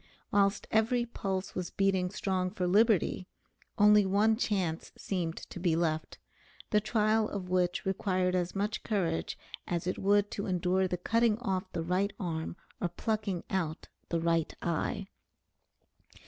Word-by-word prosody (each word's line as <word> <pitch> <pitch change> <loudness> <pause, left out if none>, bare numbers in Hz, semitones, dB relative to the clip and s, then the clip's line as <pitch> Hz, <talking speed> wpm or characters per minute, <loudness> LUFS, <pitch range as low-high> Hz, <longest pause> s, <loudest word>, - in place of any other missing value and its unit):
Whilst 200 -1 +2
every 235 +2 +2
pulse 195 -4 -3
was 180 -2 -3
beating 190 -2 +1
strong 185 -2 -1
for 180 -1 -2
liberty, 200 -1 +3 0.5
only 210 0 +7
one 205 +3 +3
chance 190 -8 -1
seemed 175 -4 -2
to - - -6
be 175 -2 +2
left, 160 -2 -1 0.5
the 210 - +4
trial 215 0 +2
of 190 -3 -5
which 180 -1 +1
required 185 -1 0
as 180 0 -1
much 205 +2 -1
courage 175 -7 -1 0.3
as 170 -1 -2
it 185 - -2
would 205 +1 +3
to 200 - -3
endure 185 +1 +1
the 180 - -2
cutting 230 +4 +2
off 190 -6 -2
the 165 - -2
right 185 +4 0
arm 165 -3 -3 0.2
or - - 0
plucking 205 -1 -2
out 165 -5 -2 0.2
the 170 - 0
right 165 -1 +1
eye. 170 +3 -1
190 Hz, 145 wpm, -31 LUFS, 175-205 Hz, 0.5 s, only